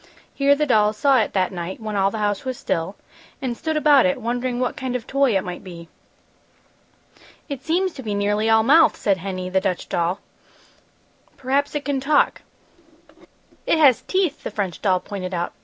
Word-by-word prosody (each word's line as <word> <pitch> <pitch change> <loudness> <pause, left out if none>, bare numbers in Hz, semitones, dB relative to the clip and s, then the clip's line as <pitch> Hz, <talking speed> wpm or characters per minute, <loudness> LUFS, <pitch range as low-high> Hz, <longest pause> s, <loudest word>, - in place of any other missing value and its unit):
Here 280 0 +3
the 300 +1 0
dolls 215 -5 +2
saw 275 0 +4
it 220 - -1
that 185 -2 +1
night, 175 0 -6
when 215 -2 -5
all 195 0 +2
the 220 - -6
house 205 -2 -1
was 260 -2 -4
still, 165 +4 -3 0.4
and 255 -4 -3
stood 315 +5 -2
about 290 -3 +5
it 275 -1 -1
wondering 245 +1 -2
what 250 -1 -1
kind 260 -1 -4
of 245 -2 -4
toy 270 -6 +2
it 190 - -2
might 180 0 -7
be. 170 -3 -11 1.6
"It 280 -4 -6
seems 350 +5 0
to - - -8
be 210 -4 -3
nearly 205 +2 0
all 220 0 +5
mouth!" 310 +7 +5
said 195 -2 +1
Henny, 185 0 -5
the 190 +1 0
Dutch 185 -3 -2
doll. 170 +3 -1 1.2
"Perhaps 275 +3 -1
it 295 - -3
can 280 -2 -1
talk." 290 +3 +2 1.3
"It - - +3
has 280 -6 +5
teeth!" 370 -6 -1
the - - -3
French 200 -5 -4
doll 185 -3 +2
pointed 185 -1 -6
out. 175 0 -3
225 Hz, 190 wpm, -22 LUFS, 195-275 Hz, 1.6 s, about